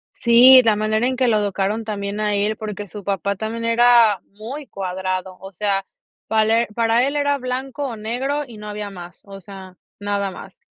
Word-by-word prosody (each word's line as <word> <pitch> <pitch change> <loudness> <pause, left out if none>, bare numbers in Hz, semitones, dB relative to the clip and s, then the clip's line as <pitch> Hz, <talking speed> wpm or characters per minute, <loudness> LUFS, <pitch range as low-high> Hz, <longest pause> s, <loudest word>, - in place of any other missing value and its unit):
Sí, 250 +2 +7
la 220 -2 +4
manera 215 +2 0
en 255 0 -1
que 255 -1 +1
lo 220 -2 +3
educaron 205 +2 -1
también 205 -1 -4
a 210 -1 0
él, 205 +2 0
porque 210 -1 -6
su 205 +1 -9
papá 200 0 -2
también 225 +2 -5
era 230 -3 +4
muy 240 +8 -8
cuadrado, 185 -1 -4
o 195 +1 -10
sea, 195 0 -1 0.4
pale 220 +1 +2
para 230 +2 +2
él 280 +2 -2
era 285 -1 +1
blanco 260 +2 -4
o 235 - -6
negro 255 +7 -3
y 230 -4 -12
no 210 0 -8
había 210 -1 -5
más, 175 -3 -11
o 195 -1 -11
sea, 190 -1 -12 0.2
nada 200 -1 -2
más. - - -12
215 Hz, 190 wpm, -20 LUFS, 200-235 Hz, 0.4 s, Sí